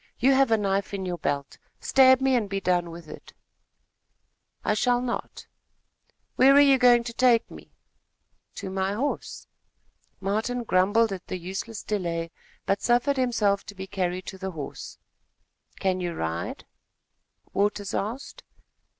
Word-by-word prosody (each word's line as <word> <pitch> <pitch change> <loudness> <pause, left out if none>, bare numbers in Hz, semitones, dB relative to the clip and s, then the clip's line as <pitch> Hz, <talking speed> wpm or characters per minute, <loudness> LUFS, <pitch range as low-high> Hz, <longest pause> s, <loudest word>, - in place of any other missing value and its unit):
You 270 +3 +4
have 270 -1 +4
a 225 - +4
knife 200 -1 -1
in 190 -1 -4
your 175 -1 -4
belt. 140 -1 -3 0.2
Stab 260 -1 +5
me, 265 0 +2
and 220 -5 0
be 195 0 -2
done 175 -2 0
with 165 -1 -10
it." - - -12 1.3
"I - - +2
shall 245 +3 +2
not." 245 -1 -5 0.9
"Where 270 +2 +6
are - - +8
you 275 -2 +6
going 245 -1 +5
to 235 0 -6
take 240 -1 +3
me?" - - -13 0.8
"To 195 -2 -6
my 190 +1 -1
horse." 265 +8 -3 0.7
Martin 220 +5 -2
grumbled 205 +2 +2
at 185 -2 -8
the 185 - -4
useless 190 +5 -6
delay, 170 -5 -3 0.3
but 195 - 0
suffered 245 +4 +2
himself 215 -6 +1
to 205 - -9
be 190 0 -6
carried 185 -2 -3
to 190 - -8
the 190 0 -4
horse. 155 -6 -8 0.8
"Can 185 -1 0
you 175 -2 -3
ride?" 80 - -4 0.9
Waters 205 0 -1
asked. 230 +7 -4
200 Hz, 150 wpm, -26 LUFS, 185-245 Hz, 1.3 s, are